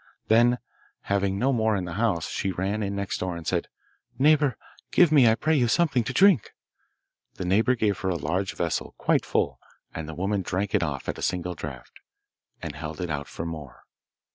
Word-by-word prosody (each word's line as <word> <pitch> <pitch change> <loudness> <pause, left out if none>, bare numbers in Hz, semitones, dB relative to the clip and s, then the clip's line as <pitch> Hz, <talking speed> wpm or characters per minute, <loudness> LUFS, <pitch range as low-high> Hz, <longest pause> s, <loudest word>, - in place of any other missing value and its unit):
Then, 120 +2 +5 0.4
having 100 -1 0
no 130 +6 +2
more 110 -2 +2
in 95 -2 -2
the 85 - -6
house, 100 -5 0
she 95 - -2
ran 95 +4 -2
in 100 -1 -2
next 100 -1 -3
door 90 -2 -3
and 85 - -9
said, - - -1 0.5
'Neighbour, 145 -3 +4 0.3
give 175 -4 +5
me, 135 -7 +6
I 110 - +4
pray 155 +6 +1
you, 125 -4 +3
something 140 -2 +2
to - - -2
drink.' 180 - +4 0.8
The 90 - -5
neighbour 110 +8 +3
gave 105 -5 0
her 95 - -1
a 90 - 0
large 90 +5 -2
vessel 85 -2 -2
quite - - +1
full, - - 0 0.3
and 80 -1 -6
the 80 - -6
woman 100 +3 -1
drank 95 +2 -2
it 105 - +3
off 75 -5 -3
at - - -3
a - - -7
single 90 0 -1
draught, 75 -6 -9 0.6
and 80 -3 -4
held 75 +1 -7
it 90 -3 -3
out 70 -1 -3
for 80 - -6
more. 80 -6 -8
100 Hz, 200 wpm, -26 LUFS, 85-115 Hz, 0.8 s, me